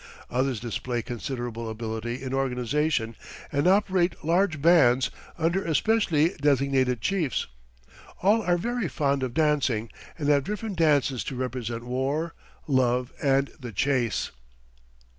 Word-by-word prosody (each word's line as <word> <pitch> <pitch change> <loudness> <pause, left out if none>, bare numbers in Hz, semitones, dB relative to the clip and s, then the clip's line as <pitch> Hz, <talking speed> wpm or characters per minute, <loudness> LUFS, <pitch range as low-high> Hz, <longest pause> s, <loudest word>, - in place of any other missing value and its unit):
Others 130 -1 0
display 120 +1 -3
considerable 120 -2 -4
ability 110 +2 -4
in 130 0 -4
organization 130 -1 0 0.4
and 145 +4 +1
operate 185 -3 +2
large 170 -1 +2
bands, 135 -6 +5 0.3
under 170 +4 +1
especially 165 -1 +2
designated 135 -4 +2
chiefs. 170 - 0 0.8
All 210 +4 +4
are 175 -4 +2
very 240 +2 -1
fond 140 -1 0
of 125 -2 -3
dancing 140 -8 +1 0.3
and 150 -3 -2
have 140 -2 +4
different 210 +3 -4
dances 145 -6 +2
to 135 - -4
represent 120 -2 -3
war, 135 +6 -1 0.3
love 125 -2 +1
and 135 -1 +2
the 125 -3 -7
chase. 120 0 0
135 Hz, 125 wpm, -26 LUFS, 125-165 Hz, 0.8 s, bands